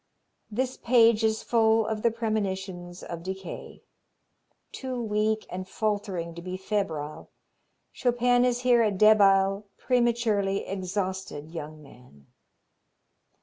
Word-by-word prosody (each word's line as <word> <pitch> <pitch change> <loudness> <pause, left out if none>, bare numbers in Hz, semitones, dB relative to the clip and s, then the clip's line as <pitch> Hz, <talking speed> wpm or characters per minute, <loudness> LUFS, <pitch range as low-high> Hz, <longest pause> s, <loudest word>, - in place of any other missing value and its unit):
This 255 +4 -2
page 230 -2 +4
is 220 0 +1
full 225 -1 +3
of 215 -1 -3
the 235 - +3
premonitions 190 -6 -3
of 170 -1 -6
decay. 190 +1 -7 0.9
Too 260 -2 -5
weak 215 -1 0
and 185 +1 -5
faltering 200 -6 -2
to 170 - -9
be 185 +1 -5
febrile, 185 -7 -3 0.6
Chopin 245 0 +2
is 245 -1 +1
here 245 -2 +4
a 220 - +3
debile, 195 -1 +4
prematurely 235 -5 +1
exhausted 190 -5 -4
young 155 -2 -8
man. 125 - -18
205 Hz, 110 wpm, -27 LUFS, 185-230 Hz, 0.9 s, page